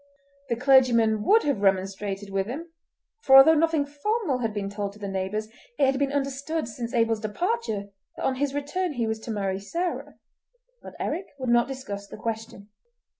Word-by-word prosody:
The 235 - +1
clergyman 240 -4 +4
would 445 +2 +5
have 280 -9 0
remonstrated 195 +1 0
with 195 0 -1
him, 320 +8 -6 0.5
for 265 0 +7
although 270 +4 +9
nothing 320 -2 +2
formal 295 - -1
had 225 -3 -1
been 205 -2 -3
told 200 0 -4
to - - -15
the 205 - -5
neighbours, 195 +3 -2 0.3
it 275 - +4
had 270 0 +1
been 280 -1 +1
understood 280 +1 -2
since 235 0 -5
Abel's 225 -1 +2
departure 220 - -2 0.3
that - - -3
on 260 - 0
his 285 0 -1
return 315 +4 -2
he 240 -4 -1
was 220 0 -2
to 225 - -10
marry 195 -3 -1
Sarah; 340 - -4 0.7
but - - -11
Eric 350 +6 -3
would 260 -2 -3
not 240 0 +4
discuss 205 -7 -6
the - - -10
question. 220 -2 -5
240 Hz, 180 wpm, -26 LUFS, 205-285 Hz, 0.7 s, although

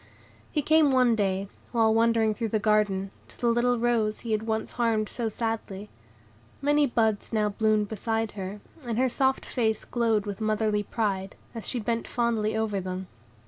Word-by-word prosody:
He 295 - 0
came 310 0 +5
one 250 -3 +4
day, 195 -2 0 0.2
while 225 -2 +3
wandering 225 -1 +3
through 230 +1 -2
the 220 - 0
garden, 205 -2 +1 0.2
to - - -18
the 240 - +2
little 245 +1 +2
rose 230 -3 +1
he 230 - -5
had 215 +1 -1
once 220 0 -1
harmed 225 -3 +1
so 230 0 -3
sadly. 215 -3 -4 0.7
Many 290 0 +3
buds 220 -4 0
now 215 -2 +1
bloomed 215 0 +1
beside 225 +1 -2
her, 195 +1 -6 0.2
and 235 -3 -3
her 260 +1 +3
soft 265 +2 +1
face 220 -4 -1
glowed 225 -4 +1
with 205 0 -5
motherly 215 -1 +1
pride, 200 -2 -2 0.2
as 230 -2 -6
she 245 - -1
bent 230 +1 -2
fondly 225 -3 0
over 210 -3 -1
them. 185 0 -5
220 Hz, 175 wpm, -27 LUFS, 210-235 Hz, 0.7 s, came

